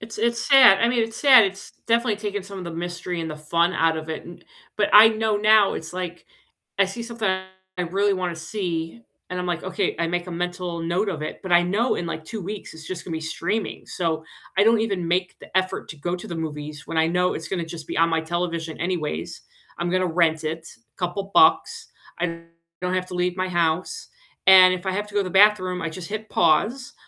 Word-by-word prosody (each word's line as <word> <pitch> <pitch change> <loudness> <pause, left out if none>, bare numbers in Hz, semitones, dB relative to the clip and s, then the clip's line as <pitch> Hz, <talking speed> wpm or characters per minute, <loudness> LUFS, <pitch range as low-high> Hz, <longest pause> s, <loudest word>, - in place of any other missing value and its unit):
It's 220 +1 -9
it's 235 0 0
sad 255 -8 +8
I 230 - +3
mean, 240 -1 +1
it's 225 0 -6
sad, 260 -7 +7
it's 195 +1 -7 0.2
definitely 230 -2 +2
taken 205 -2 -4
some 200 0 -9
of - - -7
the 170 - -6
mystery 175 +1 -5
and 160 -1 -4
the 155 - -6
fun 170 +4 0
out 165 0 +2
of 160 0 -7
it 160 - -5
and 175 0 -12 0.3
but, 210 - +1
I 215 +2 +10
know 220 -1 0
now, 215 -1 +5
it's, 160 - -6
like, 180 -1 -6 0.5
I 195 - +4
see 195 +5 -6
something 230 -3 -3
I 190 0 -5
really 195 +4 +1
wanna 180 -2 -3
see, 165 +3 -4 0.3
and 180 - -3
I'm, 180 - -3
like, 175 -1 -2
"Okay," 185 -1 -2
I 170 - 0
make 175 +1 -2
a - - -6
mental 175 0 -4
note 180 +5 0
of 155 -4 -4
it, - - -6
but 190 - -6
I 175 0 +6
know 210 +8 +1
in, 175 - -4
like, 160 -1 -5
2 220 +2 -6
weeks 200 -2 -7
it's 160 -1 -11
just 185 -2 -6
gonna 170 - -6
be 160 - -3
streaming, 205 +7 -3
so 160 -3 -2 0.3
I 200 - +4
don't 225 0 +4
even 195 -6 -2
make 180 +1 0
the - - -14
effort 185 0 -2
to 160 - -7
go 175 +5 -2
to 175 - -9
the 170 - -5
movies 150 -2 -6
when 165 - -5
I 160 0 +3
know 180 +1 +1
it's 160 - -6
gonna 175 -2 -3
just 165 -2 -9
be - - -4
on 165 +1 +4
my 165 -1 0
television 165 -1 -3
anyways. 175 -4 -3 0.4
I'm 175 - -1
gonna 185 +1 +1
rent 160 -2 +1
it, 160 +1 -4 0.3
couple 195 +2 -4
bucks, 450 +5 +4 0.3
I 170 -1 -2 0.4
don't 180 0 -1
have 185 0 -1
to 180 - -7
leave 180 0 0
my 185 - -1
house, 175 - -1 0.4
and 185 -1 +8
if 185 +1 -9
I 190 - 0
have 205 +2 -3
to 205 - -15
go 205 - +3
to - - -2
the 185 - -5
bathroom, 190 -2 +4
I 165 - -2
just 170 +2 -8
hit 215 +1 -5
pause, 215 - +1
180 Hz, 235 wpm, -23 LUFS, 165-205 Hz, 0.5 s, I